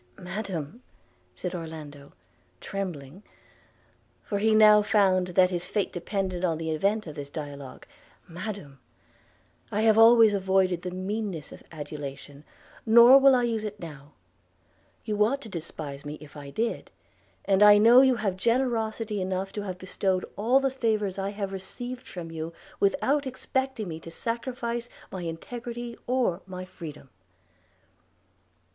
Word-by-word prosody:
'Madam,' 185 Hz, -, -5 dB, 0.5 s
said 175 Hz, -, -5 dB
Orlando 155 Hz, -4 st, -8 dB, 0.5 s
trembling, 180 Hz, -4 st, -6 dB, 1.0 s
for 200 Hz, -, -2 dB
he 220 Hz, +1 st, +3 dB
now 215 Hz, -1 st, +7 dB
found 195 Hz, -4 st, +3 dB
that 185 Hz, +1 st, +3 dB
his 180 Hz, 0 st, -2 dB
fate 205 Hz, -1 st, -1 dB
depended 185 Hz, 0 st, -3 dB
on 165 Hz, -3 st, +1 dB
the 160 Hz, 0 st, -3 dB
event 200 Hz, +7 st, 0 dB
of 155 Hz, -, -7 dB
this 145 Hz, -1 st, -7 dB
dialogue 145 Hz, -3 st, -8 dB, 0.2 s
– -, -, -31 dB
'Madam, 175 Hz, -6 st, -7 dB, 0.9 s
I 210 Hz, -, 0 dB
have 220 Hz, 0 st, +5 dB
always 225 Hz, -1 st, +7 dB
avoided 190 Hz, -2 st, +1 dB
the 180 Hz, -, -4 dB
meanness 185 Hz, -3 st, -4 dB
of -, -, -11 dB
adulation, 145 Hz, -1 st, -8 dB, 0.4 s
nor 235 Hz, +4 st, +8 dB
will 270 Hz, -1 st, +6 dB
I 245 Hz, -, +2 dB
use 225 Hz, -2 st, -1 dB
it 210 Hz, -1 st, -6 dB
now; 150 Hz, -3 st, -10 dB, 0.9 s
you 210 Hz, -1 st, +2 dB
ought 265 Hz, +6 st, +1 dB
to 225 Hz, -, -9 dB
despise 155 Hz, -5 st, -7 dB
me 150 Hz, +1 st, -6 dB
if 150 Hz, -1 st, -14 dB
I 145 Hz, -1 st, -9 dB
did; 225 Hz, +10 st, -2 dB, 0.6 s
and 195 Hz, 0 st, +2 dB
I 210 Hz, 0 st, +9 dB
know 230 Hz, +4 st, +8 dB
you 260 Hz, -1 st, +4 dB
have 210 Hz, -5 st, -1 dB
generosity 225 Hz, -2 st, 0 dB
enough 190 Hz, +1 st, -3 dB
to 210 Hz, -, -3 dB
have 185 Hz, -3 st, -5 dB
bestowed 185 Hz, 0 st, -1 dB
all 240 Hz, +6 st, +3 dB
the 270 Hz, -1 st, 0 dB
favours 215 Hz, -6 st, -1 dB
I 195 Hz, +1 st, -1 dB
have 200 Hz, -1 st, -4 dB
received 245 Hz, +6 st, -5 dB
from 170 Hz, -3 st, -7 dB
you, 165 Hz, +1 st, -5 dB, 0.3 s
without 280 Hz, +7 st, +1 dB
expecting 260 Hz, -3 st, -2 dB
me 160 Hz, -2 st, -6 dB
to 165 Hz, -, -10 dB
sacrifice 235 Hz, +4 st, -3 dB, 0.2 s
my 190 Hz, -, -5 dB
integrity 235 Hz, +8 st, -6 dB
or 240 Hz, -8 st, +1 dB
my 185 Hz, -1 st, -7 dB
freedom.' 150 Hz, -7 st, -10 dB
195 Hz, 145 wpm, -27 LUFS, 165-225 Hz, 1.0 s, I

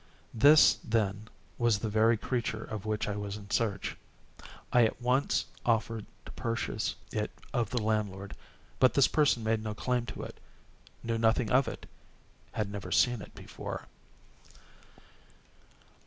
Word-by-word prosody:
This, 145 Hz, +7 st, +7 dB
then, 105 Hz, -1 st, 0 dB, 0.3 s
was 120 Hz, -3 st, +3 dB
the 110 Hz, -, -3 dB
very 110 Hz, +2 st, +3 dB
creature 115 Hz, -1 st, -2 dB
of 110 Hz, -1 st, -6 dB
which 110 Hz, 0 st, -1 dB
I 100 Hz, -, -2 dB
was 105 Hz, 0 st, -4 dB
in 100 Hz, -1 st, -12 dB
search. 105 Hz, -4 st, 0 dB, 0.8 s
I 125 Hz, -, +6 dB
at 110 Hz, -, 0 dB
once 125 Hz, +3 st, +1 dB, 0.2 s
offered 115 Hz, -2 st, 0 dB, 0.2 s
to -, -, -9 dB
purchase 115 Hz, 0 st, -2 dB, 0.2 s
it -, -, -1 dB, 0.2 s
of 120 Hz, -4 st, 0 dB
the 125 Hz, -3 st, -1 dB
landlord; 100 Hz, -3 st, -2 dB, 0.4 s
but 130 Hz, -, +5 dB
this 140 Hz, -, +6 dB
person 145 Hz, -7 st, +2 dB
made 110 Hz, 0 st, +1 dB
no 105 Hz, -1 st, -4 dB
claim 125 Hz, +1 st, -1 dB
to 105 Hz, -, -6 dB
it—knew 115 Hz, -1 st, -8 dB
nothing 115 Hz, 0 st, +2 dB
of 130 Hz, +1 st, +4 dB
it—had 105 Hz, -3 st, -8 dB
never 100 Hz, -1 st, -6 dB
seen 120 Hz, -3 st, +3 dB
it -, -, -12 dB
before. -, -, -7 dB
110 Hz, 140 wpm, -30 LUFS, 105-120 Hz, 0.8 s, This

